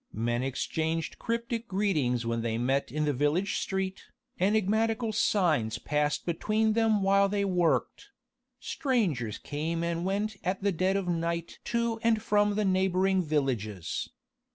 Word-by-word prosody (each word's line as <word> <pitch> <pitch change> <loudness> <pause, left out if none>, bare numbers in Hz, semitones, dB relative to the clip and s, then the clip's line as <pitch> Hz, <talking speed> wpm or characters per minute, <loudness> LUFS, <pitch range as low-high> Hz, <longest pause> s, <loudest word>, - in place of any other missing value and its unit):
Men 120 +2 -1
exchanged 160 +5 -2
cryptic 235 0 -2
greetings 155 - 0
when 115 0 -1
they 115 -1 -1
met 130 +2 0
in 150 +2 0
the 145 - +1
village 150 +9 +1
street, 190 -1 -3 0.3
enigmatical 220 +3 +1
signs 155 - +2
passed 150 +3 -1
between 215 +6 +1
them 220 -2 +2
while 195 0 +4
they 200 0 0
worked: 175 - 0 0.5
strangers 175 - -1
came 160 +3 -3
and 170 0 -1
went 200 +2 -1
at 190 +2 -2
dead 185 +3 +2
of 195 -2 -2
night 170 0 -2
to 235 -1 0
and 230 -1 +3
from 205 -1 +2
the 215 0 +1
neighbouring 190 0 +2
villages. 125 - -2
185 Hz, 135 wpm, -29 LUFS, 145-210 Hz, 0.5 s, while